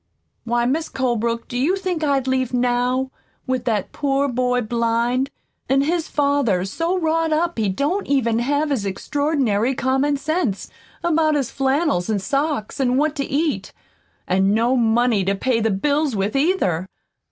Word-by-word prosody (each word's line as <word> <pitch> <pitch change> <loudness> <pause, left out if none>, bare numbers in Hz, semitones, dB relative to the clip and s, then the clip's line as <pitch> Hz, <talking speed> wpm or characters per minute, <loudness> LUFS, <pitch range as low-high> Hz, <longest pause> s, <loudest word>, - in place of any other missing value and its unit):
Why, 240 0 +1
Mis' 310 +6 -1
Colebrook, 235 -2 -1
do - - -8
you 285 +10 +2
think 365 -4 -3
I'd 275 -3 +1
leave 260 -1 0
NOW, 250 +1 +1 0.3
with 255 -1 -2
that 215 -5 -1
poor 280 -1 0
boy 250 -1 0
blind, 235 +3 0 0.4
an' 270 +1 +4
his 325 +3 0
father 280 -11 +1
so 330 - -1
wrought 325 -1 0
up 330 -3 0
he 210 -3 +1
don't 290 - -1
have - - -4
even 230 -5 +2
his 285 -1 0
extraordinary 260 +2 0
common 265 +3 +1
sense 300 - -2 0.3
about 315 -2 +2
his 275 -3 -1
flannels 270 - 0
an' 215 - +1
socks 275 +5 -2
an' 255 -1 +2
what 300 +1 +1
to 280 - 0
eat, 300 +2 -1 0.5
an' 190 +2 +2
no 235 +3 +2
money 235 -3 +2
to 195 +2 0
pay 235 +3 0
the 225 0 +1
bills 285 +6 0
with, 200 +3 -1
either? 270 - +1
260 Hz, 160 wpm, -21 LUFS, 230-290 Hz, 0.5 s, an